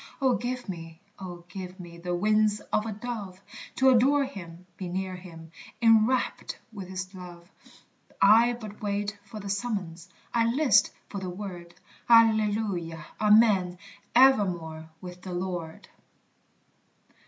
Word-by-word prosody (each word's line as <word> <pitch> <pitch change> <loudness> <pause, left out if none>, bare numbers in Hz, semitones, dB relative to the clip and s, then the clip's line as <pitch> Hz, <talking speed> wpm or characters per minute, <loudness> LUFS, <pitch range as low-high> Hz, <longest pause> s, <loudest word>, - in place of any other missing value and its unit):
Oh 260 -3 +3
give 245 0 -4
me, 165 -3 -7 0.2
oh 175 -2 -8
give 185 +1 -8
me, 170 -1 -10
the 175 +1 -2
wings 215 +2 +2
of 215 - +1
a - - -3
dove, 210 -4 -6 0.4
To 265 0 +5
adore 275 +4 +4
him 180 -8 -10
be 185 - -6
near 185 +1 -3
him 165 -3 -12 0.3
enwrapt 225 +2 +2 0.2
with 195 -3 -7
his 185 +1 -6
love; 175 -2 -11 0.7
I 230 +4 +6
but 215 -3 -9
wait 205 0 -2
for 215 +1 -9
the 200 - -8
summons, 195 -5 -3 0.2
I 230 -1 +3
list 255 -6 +4 0.2
for 200 - -6
the 185 -1 -5
word 175 -2 -8 0.3
Alleluia 210 -8 +3 0.2
Amen 210 -4 +4 0.4
evermore 175 -11 +3
with 180 0 -9
the 185 -1 -7
Lord! 175 -3 -5
195 Hz, 130 wpm, -27 LUFS, 175-220 Hz, 0.7 s, I